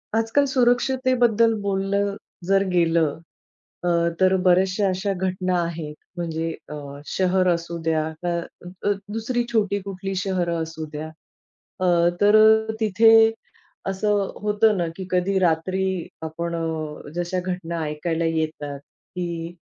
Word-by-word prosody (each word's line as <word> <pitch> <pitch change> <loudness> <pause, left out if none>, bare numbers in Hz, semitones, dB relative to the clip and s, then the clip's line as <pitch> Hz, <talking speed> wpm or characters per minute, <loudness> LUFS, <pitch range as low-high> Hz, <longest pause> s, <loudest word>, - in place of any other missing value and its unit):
आजकाल 225 +6 +2
सुरक्षतेबद्दल 245 -2 +3
बोललं 200 0 0 0.3
जर 195 0 +4
गेलं 165 -3 +2 0.7
अ, - - +2 0.3
तर 190 0 +5
बऱ्याचशा 185 +2 +3
अशा 190 +2 -1
घटना 185 0 -1
आहेत, 165 -3 -5 0.2
म्हणजे 165 -1 -2 0.2
अ, 150 - -6 0.3
शहर 185 0 +1
असू 170 0 -4
द्या. 160 -1 +1 0.2
का 175 -1 0 0.5
अ, - - +4 0.2
दुसरी 240 +2 -1
छोटी 205 -3 +1
कुठली 195 0 -5
शहरं 180 -3 -1
असू 160 0 -6
द्या. 155 +1 -5 0.7
अ, 185 - 0 0.4
तर 205 +1 +6 0.5
तिथे 220 +1 +5 0.8
असं 210 +2 0 0.3
होतं 210 0 +3
ना, 175 -2 0
की 190 - -5
कधी 185 +2 +1
रात्री 185 +1 0 0.2
आपण 170 +2 -4 0.6
जशा 175 +1 -1
घटना 180 -2 -4
ऐकायला 160 +2 -2
येतात, 155 -3 -2
की 170 +2 -7
185 Hz, 120 wpm, -23 LUFS, 170-200 Hz, 0.8 s, तर